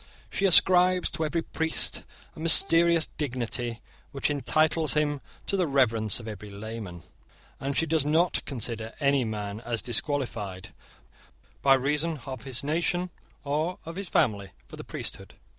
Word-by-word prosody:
She 200 - -1
ascribes 180 0 +4
to 160 - -2
every 165 +2 -2
priest 160 0 +2 0.3
a - - -12
mysterious 165 0 +6
dignity 120 -4 -3 0.3
which 140 +1 -1
entitles 155 +3 +1
him 145 -2 0 0.2
to - - -1
the 185 -3 +1
reverence 115 -7 +1
of 115 - -10
every 105 -1 -8
layman; 100 -4 -8 0.6
and 140 0 -3
she 165 - +2
does 160 -2 +1
not 160 +4 +1
consider 115 -3 -4
any 140 -2 +2
man 105 -1 -5
as 115 0 -4
disqualified, 115 -7 -2 0.9
by 135 -1 +5
reason 150 +3 -1
of 130 -3 -7
his 130 -1 -1
nation 175 +4 -1 0.3
or 155 +5 -2
of 165 +1 -8
his 195 -1 -5
family, 100 -4 +1 0.2
for - - -11
the - - -9
priesthood. - - -5
140 Hz, 145 wpm, -27 LUFS, 115-160 Hz, 0.9 s, mysterious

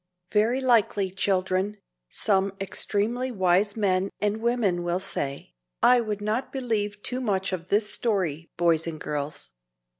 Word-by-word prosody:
Very 225 +5 +2
likely, 215 -6 +2
children, 190 +1 0 0.3
some 195 -2 +1
extremely 210 +6 0
wise 195 0 +2
men 195 -2 +1
and 210 +1 0
women 225 -7 +1
will 175 +1 -1
say, 140 -7 -4 0.3
"I 250 0 +6
would 210 -2 -3
not 215 +5 -1
believe 210 -6 -2
too 255 +1 -1
much 195 -5 -1
of 175 -1 -5
this 210 +1 +3
story, 175 -8 0
boys 170 -2 +2
and 160 -2 -5
girls." 145 0 -4
200 Hz, 140 wpm, -26 LUFS, 185-220 Hz, 0.3 s, I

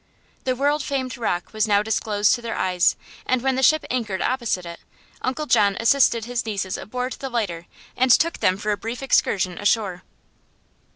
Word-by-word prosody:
The 255 -1 +1
world 290 +3 +1
famed 265 -2 -3
rock 215 -7 -3
was 215 0 +1
now 205 -1 +3
disclosed 210 -1 +1
to 240 - -2
their 230 -1 -4
eyes, 180 -1 +2 0.3
and 255 -1 +1
when 265 0 +2
the 265 - 0
ship 310 +4 +4
anchored 220 -7 -2
opposite 235 -8 -1
it 170 0 -8 0.4
Uncle 265 +4 -2
John 205 -7 +3
assisted 230 -1 +3
his 245 -1 -2
nieces 195 -4 -3
aboard 250 +3 -4
the 270 - -6
lighter 195 -9 -3 0.3
and 255 +1 +2
took 325 +7 +4
them 185 - +2
for 210 +1 -2
a 205 - 0
brief 230 +7 -6
excursion 190 -8 +1
ashore. 200 -3 0
230 Hz, 180 wpm, -23 LUFS, 200-255 Hz, 0.4 s, ship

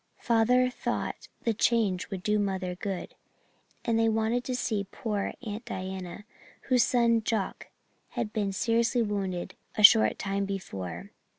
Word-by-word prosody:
Father 250 +2 +3
thought - - -3 0.2
the 230 - +2
change 210 -4 +1
would 190 -3 -5
do 210 0 +2
mother 190 -2 -1
good, 185 0 -5 0.7
and 225 -1 +2
they 225 0 +4
wanted 225 +2 +1
to 255 - -2
see 215 -5 -1
poor 210 -3 -3
Aunt 215 -1 -5
Diana, 185 +1 -6 0.4
whose 255 -2 +3
son 235 -2 +3
Jock 215 -3 -2 0.5
had 230 -3 -2
been 205 -3 0
seriously 230 +4 +2
wounded 195 -4 -3 0.2
a 215 - +1
short 220 +1 +8
time 195 0 -1
before. 95 - -5
210 Hz, 140 wpm, -28 LUFS, 195-230 Hz, 0.7 s, short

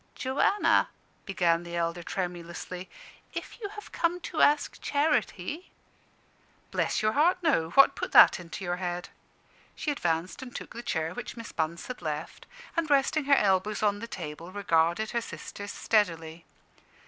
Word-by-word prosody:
"Joanna," 275 +10 +2 0.4
began 175 -4 +2
the 170 0 -7
elder, 170 0 -1
tremulously, 180 0 -5 0.5
"if - - -6
you 405 - -4
have 420 0 -10
come 345 +1 0
to 330 - -2
ask 295 0 +3
charity 285 - 0 0.5
" - - -35
"Bless - - 0
your 215 - +3
heart, 320 +9 +3
no! 215 - +2
What 275 +10 +6
put - - -4
that - - +8
into 175 +3 -8
your 175 0 -1
head?" 180 0 -4 0.7
She 300 - -2
advanced 170 - -1
and 250 -2 -9
took - - -7
the 235 - -6
chair 160 -6 -2
which 245 0 -7
Miss 230 0 -7
Bunce 160 +1 -2
had 255 -6 -7
left, 155 -1 -5 0.3
and 335 -2 0
resting 285 +1 +3
her 280 0 +6
elbows 205 0 +2
on 205 -1 +2
the 230 - -6
table, 165 -4 -7
regarded 185 +1 +1
her 235 - 0
sisters 205 -2 -7
steadily. 165 -6 0
200 Hz, 160 wpm, -28 LUFS, 170-270 Hz, 0.7 s, that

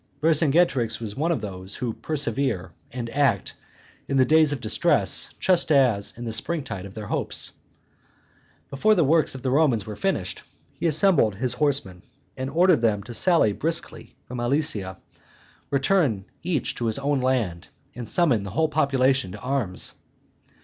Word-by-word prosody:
Vercingetorix 150 -6 +2
was 110 -3 -6
one 160 +5 0
of 150 -10 -1
those 95 -1 -7
who 120 -3 -3
persevere 125 - -3 0.2
and 120 -1 -5
act 135 -9 +1 0.5
in 135 - 0
the 130 - +5
days 155 0 +4
of 145 - -2
distress 110 - +2
just 180 -3 +2
as 125 -8 +3
in 120 - -7
the 115 - -3
spring 155 +8 +1
tide 100 -8 -7
of 95 - -15
their 110 -1 -6
hopes. - - -2 1.2
Before 215 +11 +3
the 175 - +3
works 155 0 +2
of 130 - -9
the 130 - 0
Romans 130 -8 +2
were 105 - -7
finished, 115 - -2 0.3
he 170 - -2
assembled 155 - +4
his 125 +4 0
horsemen, 125 -10 0 0.3
and 130 0 -4
ordered 170 -1 +3
them 105 -3 +1
to 120 - -9
sally 165 - +3
briskly 165 +8 -3
from 125 0 -6
Alesia, 120 - 0 0.7
return 140 - +1 0.2
each 165 -7 -2
to 120 - -3
his 110 - -1
own 140 0 0
land, 115 -10 -1 0.3
and 120 -2 -8
summon 145 - +2
the 100 - -6
whole 160 +11 0
population 135 -8 +1
to - - -9
arms. 125 -8 -2
130 Hz, 165 wpm, -24 LUFS, 110-155 Hz, 1.2 s, the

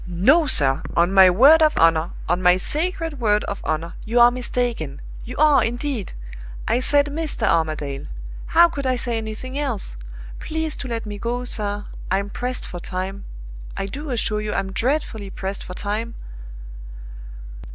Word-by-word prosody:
"No, 260 - +3
sir 135 - +2 0.2
on 175 +3 +3
my 190 -1 +8
word 275 - +6
of 310 -1 +3
honor, 165 0 +3 0.2
on 180 - 0
my 180 0 +5
sacred 325 - -2
word 210 -3 +2
of 200 - -5
honor, 160 +2 -2
you 235 +3 +1
are 240 0 +8
mistaken 240 - -3 0.2
you 250 - -8
are, 300 -1 +5
indeed! 240 -2 -3 0.5
I 240 - +2
said 285 +2 +4
Mr. 305 +1 -2
Armadale 155 - -1 0.4
how 340 +1 +6
could 280 -5 -4
I 255 - +2
say 240 -2 -2
anything 225 +5 -6
else? 235 - -3 0.4
Please 320 -1 -3
to 270 - -5
let 230 -2 -3
me 205 -1 -6
go, 240 +3 -2
sir 205 -4 -2 0.2
I'm 195 +2 -1
pressed 250 +1 -4
for 175 - -7
time. 190 +3 -5 0.5
I - - -2
do 285 +10 -6
assure 220 -3 0
you 210 0 -3
I'm 195 -1 -2
dreadfully 225 -3 -1
pressed 195 +1 -5
for 180 - -8
time!" 215 +4 -3
225 Hz, 160 wpm, -22 LUFS, 190-270 Hz, 0.5 s, my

